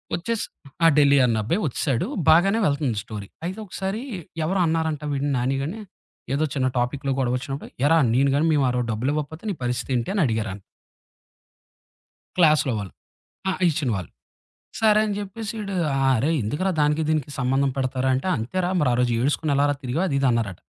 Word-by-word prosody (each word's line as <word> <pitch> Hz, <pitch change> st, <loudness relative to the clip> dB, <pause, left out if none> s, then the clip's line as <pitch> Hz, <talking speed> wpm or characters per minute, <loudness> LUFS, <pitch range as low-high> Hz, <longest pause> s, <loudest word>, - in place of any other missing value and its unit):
వచ్చేసి 220 Hz, +5 st, -2 dB, 0.4 s
ఆ! -, -, +9 dB
ఢిల్లీ 140 Hz, -1 st, +6 dB
అన్న 115 Hz, -3 st, +1 dB
అబ్బాయి 170 Hz, -, 0 dB
వచ్చేసాడు. 135 Hz, -2 st, -1 dB, 0.2 s
బాగానే 195 Hz, +7 st, +5 dB
వెళ్తుంది 140 Hz, -, 0 dB
స్టోరీ. 105 Hz, -3 st, -7 dB, 0.2 s
అయితే 190 Hz, +5 st, -4 dB
ఒకసారి 195 Hz, +3 st, -4 dB, 0.4 s
ఎవరో 190 Hz, +4 st, 0 dB
అన్నారంటా 160 Hz, -2 st, -1 dB
వీడిని 140 Hz, +1 st, -1 dB
నానిగాని. 135 Hz, -, -2 dB, 0.5 s
ఏదో 145 Hz, +3 st, +1 dB
చిన్న 130 Hz, -2 st, +1 dB
టాపిక్‌లో 135 Hz, +3 st, -1 dB
గొడవొచ్చినప్పుడు 130 Hz, +2 st, -2 dB, 0.2 s
"ఎరా! 165 Hz, +2 st, +5 dB, 0.2 s
నేను 135 Hz, +3 st, +3 dB
గాని 150 Hz, -, +2 dB
మేము 145 Hz, -2 st, +3 dB
ఆరో 125 Hz, 0 st, 0 dB
డబ్బులు 115 Hz, +5 st, -1 dB
ఇవ్వకపోతే 155 Hz, +2 st, -4 dB
నీ -, -, 0 dB
పరిస్థితేంటి" 125 Hz, +1 st, -1 dB
అని 200 Hz, -, +1 dB
అడిగారన 110 Hz, -4 st, -2 dB, 1.8 s
క్లాస్‌లో 155 Hz, -6 st, +4 dB
వాళ్ళు. 100 Hz, -2 st, -7 dB, 0.6 s
ఆహ్, 185 Hz, -, -2 dB
ఇచ్చిన 145 Hz, -4 st, -1 dB
వళ్ళు. 90 Hz, -, -6 dB, 0.7 s
సరే 215 Hz, -1 st, +5 dB
అని 205 Hz, -, -2 dB
చెప్పేసి 205 Hz, +2 st, -5 dB
ఈడు, 200 Hz, -1 st, -4 dB, 0.2 s
"ఆ! 135 Hz, -, +1 dB, 0.2 s
అరే 135 Hz, -, +1 dB
ఎందుకురా 150 Hz, -, -1 dB
దానికి 150 Hz, +2 st, +2 dB
దీనికి 155 Hz, -3 st, 0 dB
సంబంధం 135 Hz, +1 st, +1 dB
పెడతారు? 130 Hz, -1 st, -1 dB
అంటే, 130 Hz, +5 st, -2 dB
అంతేరా, 175 Hz, +11 st, -2 dB
మరి 150 Hz, -, +2 dB
ఆ -, -, +2 dB
రోజు 125 Hz, -1 st, +2 dB
ఏడుసుకొని 145 Hz, +3 st, 0 dB
ఎలారా 145 Hz, +1 st, +2 dB
తిరిగావ్" 130 Hz, +8 st, -1 dB
అది 140 Hz, -, -1 dB
ఇది 135 Hz, -, +2 dB
అన్నారట. 110 Hz, -6 st, -1 dB
140 Hz, 165 wpm, -24 LUFS, 125-165 Hz, 1.8 s, ఆ